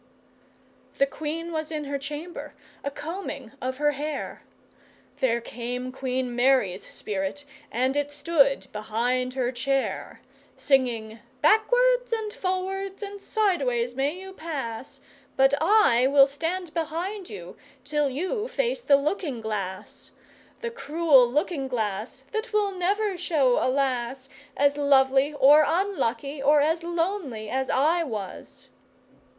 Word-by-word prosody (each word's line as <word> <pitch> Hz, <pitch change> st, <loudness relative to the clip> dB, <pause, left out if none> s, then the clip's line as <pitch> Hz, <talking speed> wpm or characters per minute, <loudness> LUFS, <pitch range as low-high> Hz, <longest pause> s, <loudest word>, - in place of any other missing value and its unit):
The 275 Hz, -, +5 dB
Queen 315 Hz, +4 st, -5 dB
was 315 Hz, -1 st, -3 dB
in 305 Hz, -1 st, -3 dB
her 280 Hz, 0 st, -3 dB
chamber, 300 Hz, +5 st, -7 dB, 0.3 s
a 280 Hz, -, -1 dB
combing 290 Hz, -, -6 dB
of 255 Hz, +1 st, -3 dB
her 295 Hz, +1 st, +2 dB
hair, 295 Hz, +1 st, -5 dB, 0.8 s
There 235 Hz, -3 st, +2 dB
came 245 Hz, +2 st, -5 dB
Queen 255 Hz, -1 st, -2 dB
Mary's 245 Hz, -7 st, +2 dB
spirit 200 Hz, +8 st, -4 dB, 0.3 s
and 255 Hz, +3 st, +1 dB
it 290 Hz, 0 st, 0 dB
stood 285 Hz, -3 st, +2 dB
behind 245 Hz, +4 st, -1 dB
her 250 Hz, -2 st, 0 dB
chair, 270 Hz, +2 st, -2 dB, 0.4 s
Singing, 235 Hz, -5 st, +1 dB, 0.2 s
'Backwards -, -, +4 dB
and 440 Hz, -2 st, -2 dB
forwards 385 Hz, +2 st, -3 dB
and 405 Hz, 0 st, -7 dB
sideways 275 Hz, -, +1 dB
you -, -, -19 dB
may 345 Hz, +8 st, -2 dB
pass, 275 Hz, -9 st, -6 dB, 0.4 s
But 270 Hz, +1 st, +5 dB
I 320 Hz, -, +5 dB
will 275 Hz, 0 st, +7 dB
stand 325 Hz, +4 st, -3 dB
behind 345 Hz, +5 st, -3 dB
you 180 Hz, -4 st, -9 dB, 0.3 s
till 295 Hz, 0 st, +1 dB
you 375 Hz, -, -2 dB
face -, -, -1 dB
the 280 Hz, -10 st, +5 dB
looking 290 Hz, -3 st, -2 dB
glass. 205 Hz, -3 st, -5 dB, 0.5 s
The 470 Hz, -1 st, -3 dB
cruel 315 Hz, -, +4 dB
looking 285 Hz, +2 st, -1 dB
glass 225 Hz, +1 st, -3 dB
that 440 Hz, +2 st, -3 dB
will 420 Hz, -2 st, +2 dB
never 390 Hz, +2 st, 0 dB
show 290 Hz, -8 st, +2 dB
a -, -, +2 dB
lass 260 Hz, -1 st, -1 dB, 0.3 s
As 285 Hz, 0 st, +3 dB
lovely 275 Hz, 0 st, +4 dB
or 290 Hz, +2 st, +7 dB
unlucky 305 Hz, -, -1 dB
or 295 Hz, +2 st, +5 dB
as 320 Hz, +3 st, +2 dB
lonely 335 Hz, -, -2 dB
as 265 Hz, 0 st, -1 dB
I 315 Hz, +6 st, +3 dB
was! 215 Hz, -, -7 dB
285 Hz, 130 wpm, -26 LUFS, 255-345 Hz, 0.8 s, will